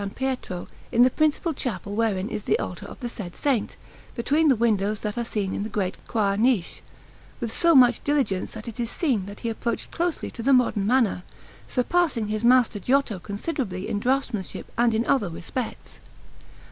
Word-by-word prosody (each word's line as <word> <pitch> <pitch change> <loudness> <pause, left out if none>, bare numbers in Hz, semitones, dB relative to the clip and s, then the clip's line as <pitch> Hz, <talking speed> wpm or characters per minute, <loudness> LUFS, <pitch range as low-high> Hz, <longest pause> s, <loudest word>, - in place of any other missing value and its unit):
Pietro, 260 -9 -3 0.2
in 240 - +5
the 255 - +5
principal 310 +3 +1
chapel 210 -7 -4
wherein 210 -4 0
is 210 - -4
the 430 - +1
altar - - -5
of - - -11
the 245 - -2
said 200 -7 -7
Saint, 265 -7 0 0.4
between 295 +6 +2
the 270 - +5
windows 210 -2 +1
that 210 -1 -3
are 235 -1 -2
in 195 0 -2
the 215 - -3
great 195 -3 -1
choir 200 -3 +1
niche, 225 -6 +1 0.6
with 235 -2 -3
so 335 -2 +4
much 245 -3 +6
diligence 275 -11 0
that 220 0 -9
it 230 0 -7
is 235 -1 -1
seen 235 - 0
that 200 0 -9
he 235 - -2
approached 230 +1 -3
closely 345 -1 -2
to 235 - -7
the 270 +4 +3
modern 230 -5 +3
manner, 235 -6 +2 0.5
surpassing 255 -5 +1
his 215 +1 -2
master 245 -3 +4
Giotto 250 -2 +1
considerably 200 - -4
in 205 - -1
draughtsmanship 245 -5 -1
and 235 -1 +3
in 230 +2 +1
other 215 -9 +2
respects. 195 +9 -6
230 Hz, 180 wpm, -25 LUFS, 205-260 Hz, 0.6 s, much